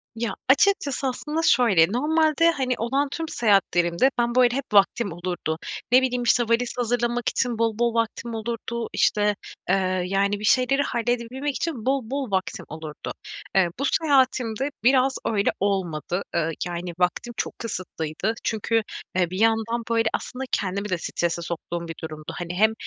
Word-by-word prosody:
Ya 230 0 -2
açıkçası 280 -3 +3
aslında 300 +5 -2
şöyle, 230 - +5
normalde, 315 +4 +3
hani, 260 -5 -1
olan 270 +5 0
tüm 325 +3 -4
seyahatlerimde 195 - +2
ben, 240 0 +1
böyle, 245 -1 +4
hep 270 -5 -4
vaktim 200 +1 +4
olurdu. 175 -2 -3 0.3
Ne 255 +1 +7
bileyim, 250 -1 0
işte, 240 0 +4
valiz 235 +1 0
hazırlamak 240 0 0
için 240 -3 -1
bol 225 -1 0
bol 235 -1 +2
vaktim 230 0 -2
olurdu 230 +1 -4
işte, 210 -1 +2 0.3
eee, 190 - +5 0.3
yani, 200 +2 +1
bir 210 - -8
şeyleri 265 +4 +3
halledebilmek 245 +3 -2
için 280 -10 -3
bol 265 -4 0
bol 270 -5 -3
vaktim 190 -1 -2
olurdu. 155 -1 -7 0.4
Eee, 190 -3 +4
bu - - -1
seyahatimde 265 -4 +2
biraz 260 +1 +4
öyle 205 -3 +1
olmadı. 185 -3 -1
Eee, 165 -1 +1 0.2
yani, 175 0 -5
vaktim 180 +7 0
çok - - -3
kısıtlıydı. 185 -2 -3
Çünkü, 225 +1 +1 0.3
eee, 180 -2 +2
bir 185 - -4
yandan 225 +1 +2
böyle 230 -1 +2
aslında 255 +1 -4
kendimi 200 +1 -1
de 180 - 0
strese 170 0 -2
soktuğum 170 0 -5
bir 165 - -6
durumdu. 155 0 -7
Hani, 175 0 -4
hem, 220 +4 +4
230 Hz, 155 wpm, -24 LUFS, 185-255 Hz, 0.4 s, Ne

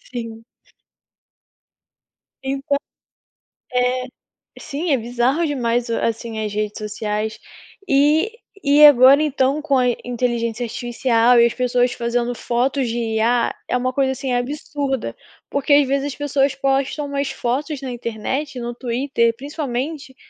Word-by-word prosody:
Sim. 230 -2 -7 2.0
Então 275 +1 -1 1.0
É. 250 0 +1 0.5
Sim, 315 +5 -4
é 275 - +4
bizarro 245 +7 0
demais, 240 -4 -1
assim, 230 -1 -2
as 210 - -3
redes 210 0 -3
sociais. 215 0 -3 0.5
E 300 +8 +3 0.3
e 290 +1 +6
agora, 275 +1 +7
então, 280 -1 +1
com 300 -3 +1
a 250 -1 +3 0.2
inteligência 240 -1 -2
artificial 240 0 +2
e 235 - +7
as 235 - 0
pessoas 250 0 +1
fazendo 240 +1 -1
fotos 250 +2 0
de 230 - -3
IA, 230 +1 +1
é - - +1
uma 255 +1 -1
coisa, 265 0 +1
assim, 265 0 -3
absurda, 270 - -2 0.4
porque 280 +1 +2
às 285 -1 +5
vezes 275 +1 0
as - - -16
pessoas 280 -1 +1
postam 275 +2 0
umas 280 0 -2
fotos 275 +4 -2
na 260 -2 -4
internet, 245 +5 -4
no 240 0 -4
Twitter, 235 -1 0
principalmente 280 0 -4
255 Hz, 130 wpm, -20 LUFS, 235-280 Hz, 2.0 s, agora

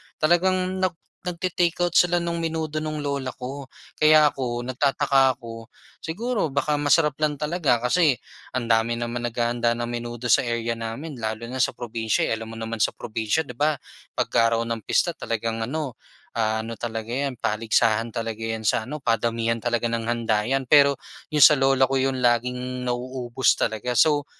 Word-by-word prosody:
talagang 185 +3 +1
nag 185 -2 0 0.3
nagte-take-out 175 -1 -1
sila 175 0 +4
nung 170 -1 -3
menudo 160 -1 -2
nung 155 -1 -3
lola 140 -3 -2
ko. 130 +1 -8 0.2
Kaya 155 0 +6
ako 125 -4 -2
nagtataka 135 0 +2
ako, 115 -1 -10 0.3
siguro 205 - -2
baka 140 +2 0
masarap 145 0 +3
lang 150 -2 0
talaga 150 -5 +1
kasi 135 +3 +2 0.3
ang 125 -2 -3
dami 115 +1 +2
naman 120 0 -3
naghahanda 120 0 0
ng 120 0 -2
menudo 120 0 -5
sa 110 - +4
area 115 -1 -2
namin 115 +7 -6
lalo 110 -1 -4
na 130 +1 0
sa - - +1
probinsiya, 115 -2 -1
eh, - - 0
alam 110 0 -8
mo 115 - -8
naman 115 -1 -2
sa - - +2
probinsiya, 115 +6 -2
di 125 - -8
ba? 150 +2 +1 0.4
'Pag-araw 115 0 +2
ng 115 -2 -3
pista - - +1
talagang 115 0 -3
ano, 140 +1 -3 0.4
ah, 110 -1 +1
ano 115 +1 -5
talaga 115 +1 -4
'yan 135 -3 -2
paligsahan 115 +1 +1
talaga 115 0 -4
'yan 110 -1 -3
sa 120 -3 +2
ano, 150 +7 -6
padamihan 115 -2 0
talaga 120 -1 0
ng 115 0 -2
handa 115 -2 0
'yan. 135 +3 -1
Pero 140 -1 +5 0.3
yung 150 - +1
sa 150 - +7
lola 135 -1 +3
ko 135 - -1
yun 135 0 +1
laging 125 +1 0
nauubos 125 0 0
talaga. 115 +3 -2
So 145 +3 +4
125 Hz, 170 wpm, -24 LUFS, 115-145 Hz, 0.4 s, sa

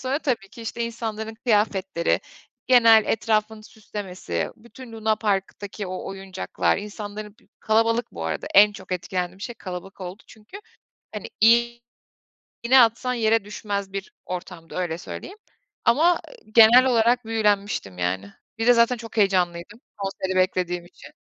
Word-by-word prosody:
sonra 260 +2 -1
tabii 245 -10 -2
ki, 230 - -11
işte, 235 +1 -3
insanların 225 -1 -5
kıyafetleri, 205 -6 +1 0.5
genel 230 -4 +7
etrafını 215 -1 0
süslemesi, 190 - -5
bütün 235 +1 -13
lunaparktaki 210 -2 -2
o 185 0 -6
oyuncaklar, 195 -1 -2
insanların 210 0 -7
b - - -27 0.2
kalabalık 230 +2 +1
bu 85 -2 -6
arada, 80 -1 -3
en 205 +1 +8
çok 190 -2 -9
etkilendiğim 180 0 -3
şey 240 +4 -6
kalabalık 185 -1 -8
oldu 185 +3 -7
çünkü. 220 - -13 0.6
Hani, 210 - -5
iğ 235 +2 +4 0.8
iğne 255 +3 +6
atsan 240 +2 +2
yere 225 -2 +2
düşmez 200 -2 -4
bir 195 -1 -6
ortamdı, 180 -2 -7
öyle 175 -3 -2
söyleyeyim, 380 - -8 0.5
ama 335 +7 +4 0.4
genel 235 +3 +8
olarak 240 -1 +3
büyülenmiştim, 205 - 0
yani. 95 +3 -2 0.2
Bir 225 +1 -1
de, 245 - +8
zaten, 235 +1 +3
çok 230 0 -10
heyecanlıydım 185 0 +1 0.2
konseri 195 -1 -3
beklediğim 180 -1 0
için. 175 - -15
210 Hz, 135 wpm, -24 LUFS, 190-230 Hz, 0.8 s, en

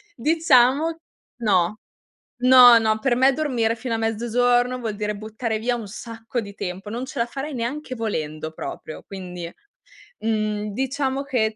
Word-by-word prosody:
diciamo 305 +2 +3 0.4
no; 200 -1 +2 0.6
no, 250 -2 +9
no, 220 -1 +1
per 245 +1 +1
me 265 +1 +5
dormire 245 -7 0
fino 235 +1 -4
a - - -1
mezzogiorno 245 +3 +1
vuol 220 -4 -3
dire 210 0 -2
buttare 220 +1 -3
via 240 +2 0
un 225 -4 -6
sacco 230 +2 -6
di 200 -3 -7
tempo, 190 +2 -6
non 240 +4 -4
ce 245 - -7
la 235 - +2
farei 275 +4 -6
neanche 255 +3 -4
volendo 155 -8 -3
proprio; 155 - -7
quindi, 180 -3 -7 0.7
mhmm, 215 -2 -1
diciamo 270 +2 -1
che, 225 -6 0
230 Hz, 150 wpm, -23 LUFS, 215-255 Hz, 0.7 s, no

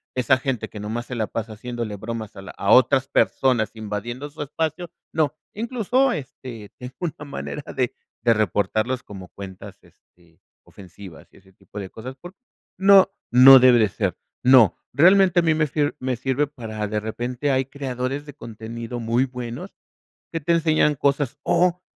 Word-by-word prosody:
esa 130 +1 +3
gente 130 -3 -3
que 105 - -10
nomás 110 +3 -4
se 125 - -8
la 110 -2 -1
pasa 115 -1 -5
haciéndole 115 -1 -5
bromas 110 +1 -6
a - - -9
la 95 - -9
a 100 - 0
otras 130 +1 +5
personas, 125 -6 +2
invadiendo 110 +6 -5
su 150 - -9
espacio, 160 +3 -3 0.2
no. 155 -2 +1 0.2
Incluso, 245 +4 +1
este, 130 - -7
tengo 125 0 -9
una 165 -4 -4
manera 145 +1 -6
de 125 -2 -1 0.3
de 115 -1 +5
reportarlos 110 +4 0
como 95 -3 -10
cuentas, 95 -2 -10
este, 85 -2 -27 0.2
ofensivas 95 -2 -13
y - - -20
ese 95 0 -22
tipo 105 - -11
de 95 -2 -6
cosas 125 +6 -9
por 175 +7 -12 0.4
no, 195 0 +6 0.2
no 130 +2 +10
debe 125 -1 +6
de 110 - +4
ser. - - -2 0.3
No. 125 -4 +6 0.2
Realmente 185 +3 +5
a - - +2
mí 165 -1 +3
me 155 -1 +1
sir 145 +1 -1
me 130 0 -2
sirve 130 +4 0
para 110 -6 -6
de 105 0 -2
repente 120 +6 -3
hay 130 0 +1
creadores 135 +1 -4
de 145 - -10
contenido 115 -1 -7
muy 120 +3 +1
buenos 125 -2 -7 0.6
que 165 - -1
te 170 - 0
enseñan 155 -2 +2
cosas, 140 0 0
o 180 0 +2
125 Hz, 170 wpm, -23 LUFS, 110-145 Hz, 0.6 s, no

